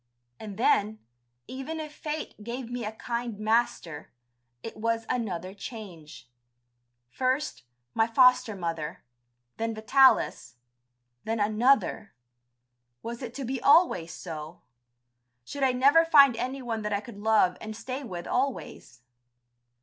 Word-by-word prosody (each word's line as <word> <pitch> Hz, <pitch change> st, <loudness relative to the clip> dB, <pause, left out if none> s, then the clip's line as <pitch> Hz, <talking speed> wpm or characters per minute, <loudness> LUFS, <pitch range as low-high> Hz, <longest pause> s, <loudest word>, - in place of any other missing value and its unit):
And 205 Hz, -2 st, -8 dB
then, 215 Hz, -2 st, +2 dB, 0.5 s
even 270 Hz, +5 st, -6 dB
if 305 Hz, -1 st, -7 dB
fate 300 Hz, -8 st, -6 dB
gave 240 Hz, +1 st, -6 dB
me 245 Hz, -1 st, -4 dB
a 210 Hz, -, -3 dB
kind 235 Hz, 0 st, -4 dB
master, 215 Hz, -8 st, -1 dB, 0.5 s
it 225 Hz, -, -7 dB
was 230 Hz, +1 st, -1 dB
another 190 Hz, -7 st, -3 dB
change. 180 Hz, -, -10 dB, 0.8 s
First, 260 Hz, -, -1 dB, 0.3 s
my 225 Hz, -, +2 dB
foster 250 Hz, -2 st, +4 dB
mother, 165 Hz, -4 st, -4 dB, 0.5 s
then 225 Hz, 0 st, -2 dB
Vitalis, 220 Hz, -, +3 dB, 0.7 s
then 225 Hz, 0 st, -2 dB
another.... 215 Hz, -, +1 dB, 0.9 s
Was 235 Hz, +2 st, -6 dB
it 240 Hz, -2 st, -7 dB
to 275 Hz, -, -4 dB
be 260 Hz, +1 st, -3 dB
always 280 Hz, -, +4 dB
so? 160 Hz, -1 st, -8 dB, 0.8 s
Should 285 Hz, -, -7 dB
I 265 Hz, -1 st, +4 dB
never 280 Hz, +6 st, +5 dB
find 285 Hz, -6 st, +6 dB
anyone 250 Hz, -2 st, -3 dB
that 210 Hz, 0 st, -3 dB
I 200 Hz, -, +1 dB
could 205 Hz, 0 st, -11 dB
love 210 Hz, -4 st, +3 dB
and 215 Hz, 0 st, -6 dB
stay 255 Hz, +4 st, -5 dB
with 180 Hz, -9 st, -7 dB
always? 250 Hz, -, -3 dB
230 Hz, 125 wpm, -27 LUFS, 205-260 Hz, 0.9 s, find